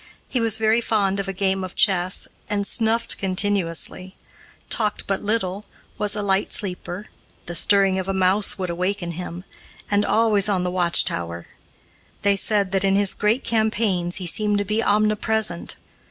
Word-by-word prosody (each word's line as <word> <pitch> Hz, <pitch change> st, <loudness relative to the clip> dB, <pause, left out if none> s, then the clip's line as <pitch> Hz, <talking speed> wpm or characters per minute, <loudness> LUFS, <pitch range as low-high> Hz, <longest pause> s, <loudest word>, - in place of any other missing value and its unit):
He 250 Hz, -, -1 dB
was 225 Hz, -2 st, +2 dB
very 220 Hz, +1 st, +2 dB
fond 200 Hz, -4 st, 0 dB
of 200 Hz, -, -3 dB
a -, -, -2 dB
game 190 Hz, 0 st, -1 dB
of 185 Hz, -, -7 dB
chess, 185 Hz, -2 st, +2 dB, 0.2 s
and 205 Hz, -1 st, 0 dB
snuffed 230 Hz, +2 st, +2 dB
continuously; 185 Hz, -1 st, -1 dB, 0.5 s
talked 210 Hz, -2 st, 0 dB
but 195 Hz, -1 st, -2 dB
little, 205 Hz, -2 st, -2 dB, 0.3 s
was 210 Hz, 0 st, +1 dB
a 210 Hz, -, -3 dB
light 195 Hz, 0 st, +1 dB
sleeper, 185 Hz, 0 st, -4 dB, 0.4 s
the 175 Hz, -, -6 dB
stirring 195 Hz, +2 st, +3 dB
of 190 Hz, -, -4 dB
a -, -, 0 dB
mouse 190 Hz, +2 st, +3 dB
would 185 Hz, -2 st, -3 dB
awaken 180 Hz, 0 st, -2 dB
him, 175 Hz, +1 st, -7 dB, 0.5 s
and 205 Hz, 0 st, +3 dB
always 215 Hz, -2 st, +2 dB
on 190 Hz, -3 st, 0 dB
the 180 Hz, -, -2 dB
watch 175 Hz, -2 st, +2 dB
tower. 85 Hz, 0 st, -4 dB, 0.7 s
They 200 Hz, 0 st, +3 dB
said 200 Hz, -1 st, +2 dB
that, 195 Hz, -1 st, 0 dB
in 195 Hz, 0 st, +2 dB
his 200 Hz, -1 st, +2 dB
great 215 Hz, +5 st, 0 dB
campaigns, 215 Hz, -6 st, 0 dB
he 185 Hz, -, -3 dB
seemed 210 Hz, +4 st, +1 dB
to 205 Hz, -, -1 dB
be 215 Hz, +3 st, 0 dB
omnipresent. 215 Hz, -2 st, 0 dB
200 Hz, 170 wpm, -22 LUFS, 185-210 Hz, 0.7 s, stirring